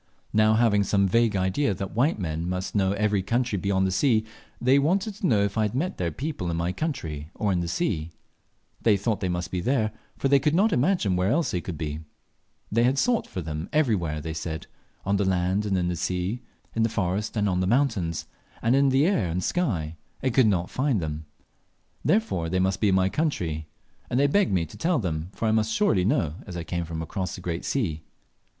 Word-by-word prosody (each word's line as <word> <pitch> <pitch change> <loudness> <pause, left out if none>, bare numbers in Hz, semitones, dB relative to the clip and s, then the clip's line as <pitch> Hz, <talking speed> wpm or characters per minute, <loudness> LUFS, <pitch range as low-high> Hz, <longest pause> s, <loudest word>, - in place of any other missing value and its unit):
Now 110 +1 +4
having 110 -3 +3
some 100 0 +2
vague 115 +2 +2
idea 95 +5 +1
that 95 0 -5
white 135 +8 +2
men 85 -2 -3
must 90 +1 -3
know 95 -2 +2
every 105 -1 +1
country 120 +1 0
beyond 95 0 +1
the 95 - 0
sea, 110 +3 +2 0.3
they 130 +3 +4
wanted 190 +8 +1
to 200 -1 -2
know 105 -4 +3
if 100 +2 -1
I - - +3
had 105 +1 0
met 170 +8 -1
their 85 -2 0
people 130 - -4
in 85 - -1
my 85 +2 0
country 80 - -4
or 105 -2 0
in 90 - +1
the 85 - -2
sea. 85 - -1 0.7
They 105 -3 +4
thought 105 +2 -1
they 95 - -1
must 90 -1 -3
be 90 - -1
there, 110 0 +1 0.3
for - - 0
they 140 0 +5
could 150 +3 +1
not 210 +5 +3
imagine 125 - +2
where 90 +2 +1
else 160 +6 +1
they 90 - -1
could 85 -1 -6
be. 75 -1 -4 0.7
They 115 +3 +3
had 130 +3 +3
sought 240 - +2
for 90 - -5
them 80 +2 -5
everywhere, 95 - +1
they 80 +2 -4
said 80 0 -4 0.4
on 100 +1 +2
the 100 - +1
land 95 +2 +1
and 95 -2 +1
in 90 -1 0
the 90 - -1
sea, 90 +6 -2 0.3
in 115 - +1
the 115 - +3
forest 105 +1 -2
and 105 -1 +2
on 90 -2 +1
the 90 - +1
mountains, 110 - +1 0.4
in 135 +4 +4
the 135 +3 +3
air 185 - +2
and 80 - -2
in - - -1
the 90 - -1
sky, 85 - -1 0.3
and 130 -2 +1
could 130 -3 +5
not 90 -4 0
find 130 -4 +1
them; 75 -1 -4 0.8
therefore, 190 - +1
they 95 - 0
must 95 +1 0
be 105 - +4
in 95 - +3
my 95 0 +3
country, 85 - -2 0.4
and 125 - +1
they 140 - +4
begged 190 +7 +3
me 90 -3 +1
to 80 - -13
tell 170 0 +1
them, 85 -5 -2
for 115 - -2
I - - +3
must 110 0 +1
surely 105 - +2
know, 90 - +1
as 90 -3 -6
I 85 - -3
came 85 +1 -3
from 80 0 -4
across 90 +3 -4
the - - -9
great 85 -1 -3
sea. 85 - -1
100 Hz, 230 wpm, -26 LUFS, 90-125 Hz, 0.8 s, they